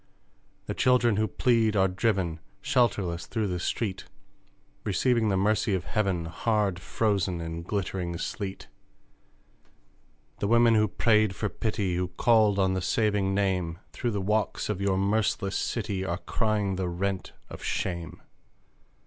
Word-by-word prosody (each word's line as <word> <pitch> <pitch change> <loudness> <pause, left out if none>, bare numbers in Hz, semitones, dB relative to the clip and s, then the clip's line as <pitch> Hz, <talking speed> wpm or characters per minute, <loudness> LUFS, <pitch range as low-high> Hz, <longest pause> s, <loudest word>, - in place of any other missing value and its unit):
The - - -3
children 120 -4 +3
who 110 0 +2
plead 115 -3 +2
are 95 -1 +4
driven, 95 -4 0 0.2
Shelterless, 100 -8 0
through 110 -3 -1
the 90 -1 -2
street, 95 +1 -2 0.8
Receiving 110 +3 +2
the 95 - +1
Mercy 105 0 +2
of 90 - -2
heaven 90 +2 -1
Hard 100 +2 0
frozen 95 -2 0
in 80 0 -5
glittering 90 -2 -3
Sleet! 95 +2 -5 1.7
The 100 - 0
women 115 +1 +5
who 110 -1 +4
prayed 105 0 +2
for 105 - -2
pity, 100 -5 -1
Who 90 0 0
called 105 +2 +3
on 95 -1 +2
the 95 - -1
saving 100 0 +1
Name, 90 -4 0 0.2
Through 120 - -2
the 105 -3 -2
walks 105 +2 0
of 100 -2 -2
your 100 -1 +1
merciless 100 -1 0
city, 95 -2 -2
Are 85 -2 -2
crying 105 -2 -1
the 95 -1 -1
rent, 95 +2 -3
of - - -10
shame! 85 -3 -3
100 Hz, 140 wpm, -27 LUFS, 90-110 Hz, 1.7 s, women